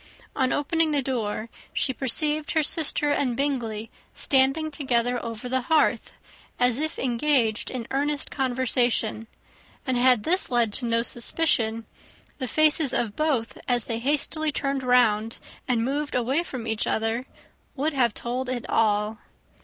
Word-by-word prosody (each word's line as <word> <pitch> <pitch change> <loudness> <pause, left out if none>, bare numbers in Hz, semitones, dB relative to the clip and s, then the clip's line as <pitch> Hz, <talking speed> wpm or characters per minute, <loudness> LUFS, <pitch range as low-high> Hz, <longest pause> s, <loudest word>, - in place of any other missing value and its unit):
On 260 -1 +1
opening 320 +2 +1
the 290 -3 +1
door, 225 -4 -3 0.3
she 265 - +1
perceived 295 +5 0
her 315 -2 +2
sister 295 -1 0
and 255 -4 0
Bingley 230 -6 -2 0.2
standing 275 +4 +2
together 245 -4 0
over 230 0 -6
the 260 +1 0
hearth, 320 -1 +2 0.5
as 245 0 +3
if 315 +1 -2
engaged 240 -3 +1
in 250 -3 -5
earnest 290 +2 -1
conversation; 245 -4 0 0.6
and 260 -3 0
had 245 -3 +4
this 365 +4 +3
led 235 -4 +1
to 245 - -2
no 230 0 +2
suspicion, 230 -3 +1 0.5
the 260 - -2
faces 310 0 +3
of 220 -4 -1
both, 285 -7 -1
as 245 -2 +1
they 230 -1 -3
hastily 300 +4 +1
turned 275 -1 -2
round 230 -3 +2 0.3
and 235 -3 +1
moved 290 +3 -2
away 255 +6 +1
from 255 -9 -6
each 220 -1 -1
other, 225 +3 -1 0.5
would 300 +3 -1
have 240 -5 +1
told 250 +2 -3
it 250 -2 -4
all. 215 0 +1
255 Hz, 145 wpm, -25 LUFS, 230-290 Hz, 0.6 s, had